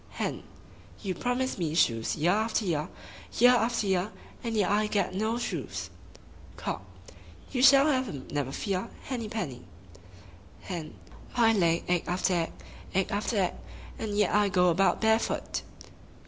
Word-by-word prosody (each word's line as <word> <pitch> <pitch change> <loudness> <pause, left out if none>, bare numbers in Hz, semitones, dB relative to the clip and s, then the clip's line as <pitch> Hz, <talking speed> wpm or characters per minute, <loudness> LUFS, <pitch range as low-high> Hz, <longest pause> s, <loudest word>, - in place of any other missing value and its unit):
Hen - - -3 0.6
—You 190 -2 -1
promise 245 +2 -1
me 160 -3 -1
shoes 115 -8 +2
year 165 +4 +2
after 220 +2 +1
year, 160 -2 -1 0.5
year 245 +2 +7
after 240 -2 +2
year, 190 +1 +1 0.3
and 230 -2 -2
yet 200 -2 +2
I 210 +1 +2
get 200 -4 0
no 220 +4 0
shoes! 240 - -4 0.7
Cock - - -3 0.7
—You 250 - 0
shall 275 +1 +8
have 260 -4 +2
them, 140 -10 -7
never 145 -2 -1
fear! 190 +3 -2
Henny 240 -5 -4
penny! 170 - -4 1.0
Hen 170 -5 -6 0.4
—I 230 -2 +5
lay 170 -5 +2
egg 175 -1 +1
after 185 +1 +1
egg, 170 -2 0 0.4
egg 190 0 +1
after 210 +2 -1
egg, 185 -3 +2 0.5
and 210 -2 -3
yet 210 -2 +2
I 205 0 +4
go 180 -1 +4
about 190 +3 +2
barefoot! 220 0 +1
200 Hz, 150 wpm, -29 LUFS, 175-225 Hz, 1.0 s, shall